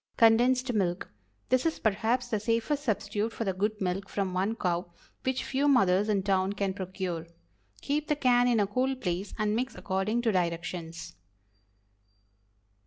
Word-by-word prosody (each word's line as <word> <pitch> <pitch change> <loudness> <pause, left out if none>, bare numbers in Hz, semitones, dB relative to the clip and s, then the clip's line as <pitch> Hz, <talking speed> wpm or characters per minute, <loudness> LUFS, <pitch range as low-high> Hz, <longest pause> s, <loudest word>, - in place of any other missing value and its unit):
CONDENSED 245 +3 +4
MILK. 185 -4 -1 0.4
This 255 0 +3
is 325 -1 0
perhaps 225 +4 0
the 220 -3 -1
safest 230 +7 0
substitute 215 -1 -1
for 230 - -4
the 195 -3 -1
"good 210 +3 -1
milk 190 +1 -2
from 195 -2 -2
one 195 +5 0
cow," 175 -4 -2 0.3
which 260 0 -1
few 275 +2 0
mothers 205 -7 +4
in 200 -2 +1
town 190 0 +1
can 200 -2 -1
procure. 185 -3 -4 0.5
Keep 295 +2 -1
the 300 - +2
can 245 -3 +3
in 240 -2 +3
a 205 - +3
cool 255 +6 0
place 185 -5 -3
and 215 -1 +1
mix 255 +3 -2
according 200 +5 -1
to 225 - +3
directions. 170 -2 -3
210 Hz, 160 wpm, -29 LUFS, 185-245 Hz, 0.5 s, CONDENSED